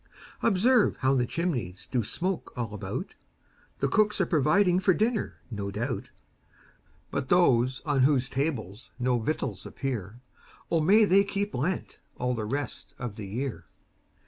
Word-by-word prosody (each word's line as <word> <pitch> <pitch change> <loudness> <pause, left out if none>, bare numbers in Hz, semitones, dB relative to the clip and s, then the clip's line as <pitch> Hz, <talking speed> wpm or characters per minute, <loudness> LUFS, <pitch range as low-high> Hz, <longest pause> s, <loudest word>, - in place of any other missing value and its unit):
Observe 225 +4 +3
how 130 +1 +3
the 125 -2 +2
chimneys 120 - -2
Do 125 -3 -1
smoke 180 - -2
all 115 -3 -3
about; 105 - -5 0.6
The 140 - +1
cooks 210 +9 +2
are - - +3
providing 175 +4 +3
For 185 -1 +3
dinner, 220 +1 0 0.2
no 100 -2 -3
doubt; 115 +6 -3 1.0
But 130 - -2
those 130 -7 +4
on 145 -3 +1
whose 130 -1 +3
tables 130 - -3
No 125 0 +1
victuals 155 +8 -2
appear, 120 -5 -4 0.5
O 165 - +3
may 210 +7 +6
they 195 +1 +5
keep 200 +1 -2
Lent 160 +9 -2 0.2
All 125 0 -1
the 110 -3 -3
rest 140 +6 -4
of 120 -5 -5
the 105 -2 -7
year. 125 +5 -4
135 Hz, 145 wpm, -28 LUFS, 120-180 Hz, 1.0 s, may